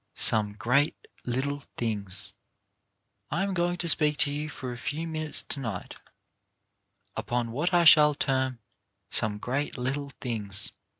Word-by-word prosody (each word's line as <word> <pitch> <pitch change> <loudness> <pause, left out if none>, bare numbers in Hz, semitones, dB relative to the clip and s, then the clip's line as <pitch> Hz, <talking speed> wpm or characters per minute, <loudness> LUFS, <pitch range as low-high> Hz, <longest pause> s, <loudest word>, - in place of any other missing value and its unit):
SOME 105 -2 +3
GREAT 125 +8 +1 0.3
LITTLE 140 +4 -2 0.2
THINGS 100 -3 -3 1.0
I 170 +6 0
Am 195 -1 -1
going 175 0 0
to 175 - -1
speak 150 -2 +5
to 145 - -3
you 150 +1 -3
for 130 -3 -6
a - - -8
few 155 +5 -3
minutes 155 -1 +1
to 140 - -5
night 110 -9 -5 1.2
upon 120 -1 -2
what 150 +10 -1
I 175 -1 +4
shall 150 -2 +7
term 130 -2 0 0.3
" - - -52
Some 105 -1 0
Great 130 +7 -3
Little 135 +3 -3
Things." 105 -5 -2
135 Hz, 145 wpm, -28 LUFS, 115-150 Hz, 1.2 s, shall